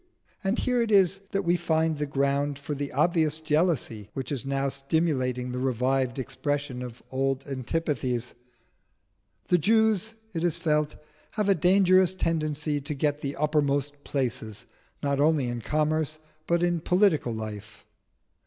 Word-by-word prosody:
And 195 Hz, +4 st, +1 dB
here 250 Hz, -1 st, +1 dB
it 230 Hz, -, 0 dB
is 195 Hz, -2 st, +4 dB
that 195 Hz, 0 st, -1 dB
we 175 Hz, 0 st, +3 dB
find 160 Hz, -3 st, +1 dB
the 150 Hz, -, -1 dB
ground 140 Hz, +1 st, 0 dB
for 140 Hz, +1 st, -5 dB
the 145 Hz, 0 st, -4 dB
obvious 155 Hz, +1 st, +2 dB
jealousy 150 Hz, -, 0 dB
which 135 Hz, 0 st, -4 dB
is 135 Hz, -4 st, -3 dB
now 135 Hz, 0 st, -1 dB
stimulating 135 Hz, -3 st, -1 dB
the 125 Hz, -, -3 dB
revived 130 Hz, 0 st, 0 dB
expression 135 Hz, 0 st, -3 dB
of 125 Hz, -1 st, -8 dB
old 135 Hz, 0 st, -1 dB
antipathies. 130 Hz, -3 st, -2 dB, 1.2 s
"The 180 Hz, -, +4 dB
Jews," 220 Hz, +2 st, +2 dB, 0.2 s
it 165 Hz, -1 st, -2 dB
is 175 Hz, -3 st, +1 dB
felt, 150 Hz, -1 st, 0 dB, 0.4 s
"have 210 Hz, -2 st, 0 dB
a -, -, +7 dB
dangerous 185 Hz, +1 st, +4 dB
tendency 155 Hz, -3 st, -1 dB
to 145 Hz, +2 st, -4 dB
get 145 Hz, +1 st, 0 dB
the 140 Hz, 0 st, -3 dB
uppermost 145 Hz, -1 st, 0 dB
places 115 Hz, -5 st, -3 dB, 0.4 s
not 140 Hz, -1 st, 0 dB
only 150 Hz, -3 st, +3 dB
in 120 Hz, -1 st, -3 dB
commerce 155 Hz, +3 st, 0 dB, 0.3 s
but 170 Hz, 0 st, +2 dB
in 175 Hz, -1 st, +1 dB
political 180 Hz, -, +2 dB
life. 110 Hz, -1 st, -7 dB
145 Hz, 145 wpm, -27 LUFS, 135-165 Hz, 1.2 s, a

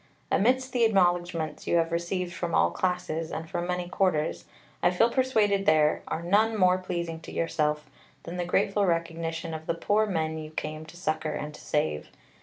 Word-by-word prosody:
Amidst 255 Hz, +4 st, +2 dB
the 245 Hz, -2 st, +2 dB
acknowledgments 175 Hz, -6 st, +1 dB
you -, -, +2 dB
have 165 Hz, 0 st, +2 dB
received 175 Hz, +1 st, -2 dB
from 175 Hz, -2 st, -2 dB
all -, -, +4 dB
classes, 180 Hz, -3 st, -2 dB
and 160 Hz, +1 st, -5 dB
from 175 Hz, +1 st, -3 dB
many 180 Hz, 0 st, -2 dB
quarters, 180 Hz, -4 st, 0 dB, 0.4 s
I -, -, +5 dB
feel 225 Hz, +6 st, +3 dB
persuaded 215 Hz, -7 st, +2 dB
there 155 Hz, -1 st, +4 dB
are 165 Hz, -, -3 dB
none 215 Hz, +5 st, +3 dB
more 185 Hz, -1 st, +4 dB
pleasing 170 Hz, -3 st, -4 dB
to -, -, -10 dB
yourself 150 Hz, -2 st, -1 dB, 0.4 s
than 170 Hz, +2 st, -6 dB
the 175 Hz, -, -1 dB
grateful 195 Hz, +3 st, +2 dB
recognition 165 Hz, -1 st, -2 dB
of 160 Hz, 0 st, -7 dB
the 170 Hz, -, 0 dB
poor 210 Hz, +5 st, +1 dB
men 160 Hz, -4 st, -1 dB
you 155 Hz, 0 st, -7 dB
came 155 Hz, 0 st, -5 dB
to 175 Hz, -, -12 dB
succour 155 Hz, -3 st, -2 dB
and 150 Hz, 0 st, -5 dB
to -, -, -12 dB
save. 75 Hz, -, -1 dB
170 Hz, 185 wpm, -27 LUFS, 160-185 Hz, 0.4 s, I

